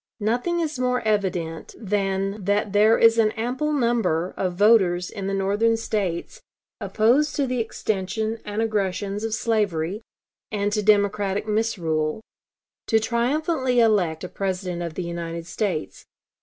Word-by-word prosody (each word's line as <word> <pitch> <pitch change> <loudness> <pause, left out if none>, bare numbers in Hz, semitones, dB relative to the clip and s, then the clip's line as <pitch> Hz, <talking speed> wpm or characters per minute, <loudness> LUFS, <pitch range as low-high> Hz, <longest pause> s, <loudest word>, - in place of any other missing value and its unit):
Nothing 245 +11 0
is 310 -5 -3
more 250 0 +1
evident 185 -6 -2
than 195 -1 -1
that 205 +1 0
there 215 +2 +5
is 230 0 +5
an 220 -1 +4
ample 250 +7 -2
number 235 - +1
of 185 -2 -1
voters 185 -4 +3
in 195 -1 -5
the 195 - -2
Northern 205 +4 +1
States, 200 -6 -3 0.4
opposed 265 +8 +2
to 285 - +1
the 255 -1 -2
extension 220 0 -2
and 210 +2 -2
aggressions 205 -1 -2
of 225 -1 -1
slavery 205 -5 -1 0.5
and 205 -1 -1
to 210 - +1
Democratic 205 -1 +2
misrule, 175 -8 0 0.7
to 220 - +4
triumphantly 255 +3 0
elect 195 -9 +2
a - - -3
President 185 -2 -3
of 170 -2 -5
the 185 - -3
United 170 -1 -5
States. 180 -3 -3
210 Hz, 140 wpm, -24 LUFS, 185-230 Hz, 0.7 s, there